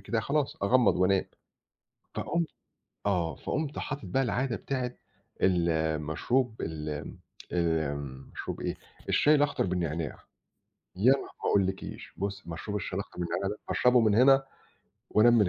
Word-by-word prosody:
كده 115 - -1
خلاص 145 +4 0
أغمّض 120 +2 +4
وأنام. 95 +1 +3 0.9
فقُمت 170 -1 0 0.6
آه، 90 -5 +1
فقُمت 150 0 -3
حاطط 145 -1 -4
بقى 135 0 +1
العادة 125 0 0
بتاعة 125 -1 -2 0.5
المشروب 85 - +1
ال 75 -1 -4
امم، 75 0 -6 0.3
آمم 70 -6 -1
مشروب - - -5
إيه، - - -2 0.3
الشاي 150 +1 +5
الأخضر 145 0 +2
بالنعناع. 85 -4 -2 0.8
يا 115 +8 +6
ن 140 - +4
ما - - -9 0.2
أقولِّكيش 95 -1 -1
بُصّي 100 +1 -3
مشروب 105 +5 -4
الشاي 95 -1 -3
الأخضر 100 - -6
بالنعناع 90 +3 -1
ده 105 +1 -4
أشربه 125 0 +4
من 110 -3 +4
هنا، 135 +4 +6 0.7
وأنام 120 +3 +6
من 105 - +4
100 Hz, 135 wpm, -29 LUFS, 85-125 Hz, 0.9 s, يا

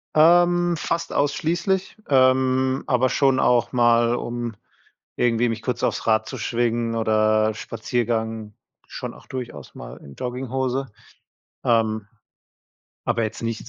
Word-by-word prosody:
Ähm, 175 +2 +4
fast 170 +2 -2
ausschließlich, 175 +7 0
ähm, 130 0 +3
aber 130 0 +2
schon 135 +1 +2
auch 120 -1 +2
mal, 120 -1 +3
um 120 -2 -4 0.6
irgendwie 120 0 +2
mich 115 -1 -3
kurz 120 0 -3
aufs - - -1
Rad 110 0 +3
zu 130 - -6
schwingen 115 0 -1
oder 110 0 +2
Spaziergang 110 -1 -3 0.3
schon - - -6
auch - - -16
durchaus 120 - -7
mal - - -9
in 70 -1 -13
Jogginghose, 130 +1 -3 0.8
ähm, 110 -3 +1 1.0
aber 115 - 0
jetzt 110 +2 -4
nicht 115 0 -4
120 Hz, 125 wpm, -23 LUFS, 115-130 Hz, 1.0 s, Ähm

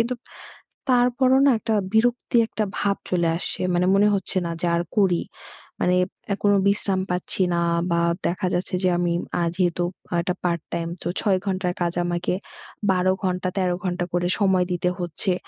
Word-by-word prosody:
কিন্তু 235 +2 0 0.8
তারপরও 250 +1 +4
না 275 - +6
একটা 225 -1 -1 0.2
বিরক্তি 240 +2 +2
একটা 215 -1 -2
ভাব 200 -1 +1
চলে 175 -2 +1
আসছে। - - -2
মানে 180 +1 +2
মনে 205 +1 +5
হচ্ছে 190 0 -2
না 170 - -2
যে 175 - +1
আর 170 - +1 0.2
করি। 190 -4 +3 0.6
মানে 180 0 +3 0.4
এ - - 0
কোনো 205 0 +5
বিশ্রাম 200 -2 +1
পাচ্ছি 180 +1 -2
না 170 - +1 0.3
বা 170 - +2 0.3
দেখা 185 +2 -1
যাচ্ছে 180 +2 -1
যে 185 - +4
আমি 175 -1 +1 0.3
আ - - +2
যেহেতু 175 -1 +1 0.3
অ - - -3
এটা 180 +1 -1
পার্ট 170 -2 0
টাইম 165 0 -2
তো - - -4
৬ 195 -3 +2
ঘন্টার 185 -2 -1
কাজ 170 0 +1
আমাকে 175 +1 -1 0.6
১২ 185 0 +2
ঘন্টা 185 0 0
১৩ 180 -2 +1
ঘণ্টা 175 -1 -1
করে 175 0 +1
সময় 190 -2 +3
দিতে 180 0 0
হচ্ছে। 175 +2 -1
185 Hz, 180 wpm, -23 LUFS, 175-200 Hz, 0.8 s, না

